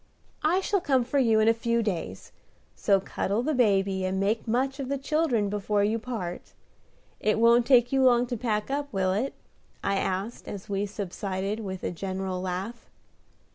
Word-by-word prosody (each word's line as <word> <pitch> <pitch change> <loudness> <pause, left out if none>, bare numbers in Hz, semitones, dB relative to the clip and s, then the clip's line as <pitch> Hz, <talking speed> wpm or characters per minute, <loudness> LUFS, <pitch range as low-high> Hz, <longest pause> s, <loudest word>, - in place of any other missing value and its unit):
"I 345 +5 +3
shall 395 0 0
come 265 -6 +2
for 255 +4 0
you 225 -4 +4
in 215 - +3
a 225 - +6
few 230 0 0
days; 165 - -4 0.4
so 195 -1 +3
cuddle 200 +3 -2
the 310 +3 0
baby 195 -6 +2
and 185 +1 -1
make 210 +4 0
much 265 +4 0
of 265 -2 -4
the 280 - 0
children 275 -6 +1
before 205 0 0
you 220 +3 +1
part. 215 -7 -6 0.7
It 215 0 +1
won't 235 +1 +5
take 245 -3 +5
you 270 - +3
long 245 -2 +5
to 245 0 -3
pack 215 0 -2
up, 285 0 -2
will 190 -2 +1
it?" 235 +8 -1 0.5
I 195 0 +1
asked, 195 +5 -3
as 200 -2 -7
we 200 0 -1
subsided 195 +1 -3
with 190 -4 -6
a - - -1
general 185 +1 -3
laugh. 190 +6 -5
215 Hz, 180 wpm, -27 LUFS, 195-250 Hz, 0.7 s, a